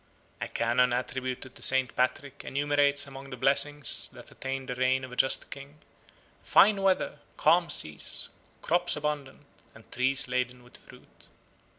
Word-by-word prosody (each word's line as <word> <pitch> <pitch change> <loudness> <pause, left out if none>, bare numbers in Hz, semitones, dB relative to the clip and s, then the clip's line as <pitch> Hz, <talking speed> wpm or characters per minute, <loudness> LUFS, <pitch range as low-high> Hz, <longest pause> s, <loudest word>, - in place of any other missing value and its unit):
A - - -2
canon 120 +2 +1
attributed 130 +1 -4
to - - -14
St. 130 -1 +3
Patrick 135 +2 -2
enumerates 145 0 +2
among 135 0 -10
the 125 - -8
blessings 145 +3 +1
that - - -14
attend 135 0 -5
the - - -1
reign 130 +1 +1
of 130 - -8
a - - -8
just 135 - +1
king 140 +1 -10 0.7
"fine 205 -1 +5
weather, 190 -1 +1 0.2
calm 170 0 +3
seas, 75 -1 +1 0.3
crops 175 +2 +1
abundant, 150 -2 -4 0.3
and 110 - -18
trees 135 +3 0
laden 125 0 -2
with 120 - -12
fruit." - - -19
135 Hz, 150 wpm, -28 LUFS, 125-145 Hz, 0.7 s, fine